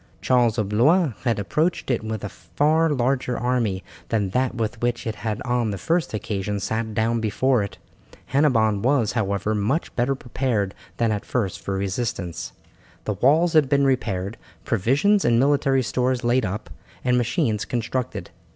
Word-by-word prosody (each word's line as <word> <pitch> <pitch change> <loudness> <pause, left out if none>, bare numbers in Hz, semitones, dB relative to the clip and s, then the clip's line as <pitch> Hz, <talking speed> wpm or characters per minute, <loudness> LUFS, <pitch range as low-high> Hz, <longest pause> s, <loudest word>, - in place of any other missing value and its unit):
Charles 120 -3 +2
of 105 -3 -1
Blois 145 - +3
had 115 -2 +2
approached 150 - 0
it 120 - 0
with 110 -1 -4
a 105 - -3
far 160 +8 +1
larger 125 -2 0
army 115 -6 0 0.3
than 105 -4 0
that 130 +4 0
with 115 0 -3
which 120 0 0
he 115 - -2
had 105 0 -4
on 120 -2 0
the 100 - -3
first 165 - 0
occasion 105 -1 -3
sat 110 +2 -3
down 115 +1 +1
before 120 +3 +2
it. 100 - -5 0.6
Hennebon 115 -8 +3
was, 125 -2 +2
however, 105 -1 -1
much 110 +10 -1
better 125 +3 +1
prepared 120 -6 -1 0.2
than 115 -2 +2
at 105 -1 -2
first 105 -8 -2
for 100 - -3
resistance. 95 - -3 0.5
The 105 - -1
walls 155 - +3
had 150 -4 +4
been 140 -1 +3
repaired, 115 -6 -1 0.3
provisions 140 - +2
and 120 -1 +3
military 135 -1 +3
stores 125 +1 0
laid 120 0 +2
up, 100 +2 -5 0.3
and 125 -1 +3
machines 120 - 0
constructed. 120 +1 -3
120 Hz, 160 wpm, -23 LUFS, 105-130 Hz, 0.6 s, had